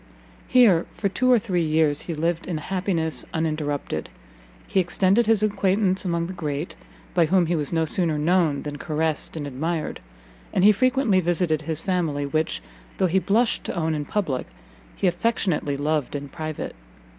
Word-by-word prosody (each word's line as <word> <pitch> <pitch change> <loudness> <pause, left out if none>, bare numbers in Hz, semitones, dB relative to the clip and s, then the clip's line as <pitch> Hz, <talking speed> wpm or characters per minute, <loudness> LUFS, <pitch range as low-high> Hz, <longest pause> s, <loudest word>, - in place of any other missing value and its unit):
Here, 215 -10 +5
for 200 - 0
two 255 +6 +2
or 245 - +7
three 195 -6 0
years, 155 -2 +2
he 170 - -4
lived 165 +2 -1
in 175 -3 -2
happiness 170 -1 -2
uninterrupted; 150 - -2 0.6
he 195 - +1
extended 190 +5 +2
his 220 -2 +4
acquaintance 195 -2 +1
among 170 -2 -1
the 185 - -5
great, 155 -2 -4 0.4
by 170 -3 +3
whom 180 +1 +3
he 170 +1 0
was 150 -3 -1
no 165 -1 +1
sooner 160 -1 0
known 160 -2 +2
than 145 -1 -6
caressed 160 0 -2
and 150 - -4
admired, 155 +4 -3 0.5
and 185 - +2
he 210 - +8
frequently 255 -2 +2
visited 170 -3 +1
his 160 0 -3
family, 165 -7 0
which, 155 +2 -1 0.3
though - - +2
he 185 +2 +3
blushed 220 +5 +1
to - - -4
own 160 -2 0
in 150 -1 -2
public, 145 -9 -2 0.5
he - - -2
affectionately 175 -6 0
loved 150 -1 -1
in 145 0 -5
private. 155 -2 -5
170 Hz, 170 wpm, -24 LUFS, 155-190 Hz, 0.6 s, he